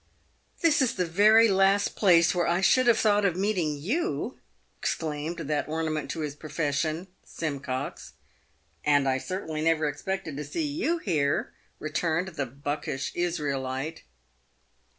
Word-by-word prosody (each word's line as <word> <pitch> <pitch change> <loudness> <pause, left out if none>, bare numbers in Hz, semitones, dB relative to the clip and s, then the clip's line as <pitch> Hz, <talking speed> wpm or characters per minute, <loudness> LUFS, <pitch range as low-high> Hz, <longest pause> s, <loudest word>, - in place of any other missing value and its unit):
31 335 - +5
"This 305 -2 +3
is 255 - +1
the 180 - 0
very 215 +7 +6
last 195 0 +3
place 170 -4 +5
where 175 -1 +1
I 170 +1 +2
should 255 +6 +4
have 235 -2 +6
thought 210 -1 +3
of 190 -4 +2
meeting 180 -6 0
you 285 - -2 0.2
!" - - -41
exclaimed 155 +1 -2
that 150 -1 -1
ornament 155 -2 -2
to 160 +3 -3
his 150 -2 -3
profession, 155 +2 -2 0.2
Simcox. 140 -5 -5 0.3
" - - -40 0.3
And 145 -2 +3
I 130 0 +1
certainly 160 -2 -4
never 160 -1 +2
expected 155 +2 -4
to 150 - -3
see 325 - -3
you 325 +3 0
here," 155 - 0 0.3
returned 165 +3 -1
the 145 -6 -3
buckish 140 +1 -4
Israelite. 150 -3 -2
165 Hz, 150 wpm, -27 LUFS, 145-195 Hz, 0.3 s, very